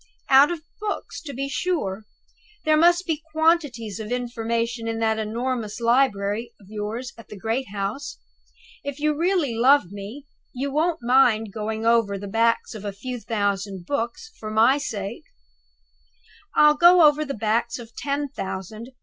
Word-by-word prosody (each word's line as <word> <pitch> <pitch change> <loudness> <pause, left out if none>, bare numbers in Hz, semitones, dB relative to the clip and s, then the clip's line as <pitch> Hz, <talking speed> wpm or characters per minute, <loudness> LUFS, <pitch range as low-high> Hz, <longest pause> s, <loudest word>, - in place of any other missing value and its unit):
"Out 270 +2 +8
of 340 -3 -4 0.2
books, 415 -1 -4
to 315 -4 -7
be 275 +1 -3
sure! 270 - -2 0.6
There 310 0 +4
must 345 +3 +4
be 315 -2 -2
quantities 305 - +1
of 215 +1 -6
information 235 -1 -2
in 225 0 -2
that 220 -1 +1
enormous 230 0 -3
library 230 -3 +1
of 200 - -18
yours 220 +4 -4
at 230 - -13
the 210 - -10
great 225 +6 -2
house. 205 +8 -4 0.7
If 285 0 -5
you 300 +1 +2
really 335 -5 +1
love 245 -3 +4
me, 205 +8 -8 0.3
you 275 +2 -3
won't 315 0 0
mind 235 -4 +3
going 220 +1 -3
over 230 -4 +3
the 200 +1 -7
backs 230 +4 +1
of 215 -2 -8
a 205 - -3
few 245 +5 -6
thousand 200 -4 -2
books, 240 - -3
for 215 - -6
my 225 +6 +4
sake!" 205 -8 -5 1.3
"I'll 300 0 +7
go 345 +1 +7
over 300 0 +5
the 275 -2 -4
backs 225 +2 0
of 235 -1 -12
ten 285 0 -2
thousand!" 195 0 -6
235 Hz, 160 wpm, -24 LUFS, 215-285 Hz, 1.3 s, Out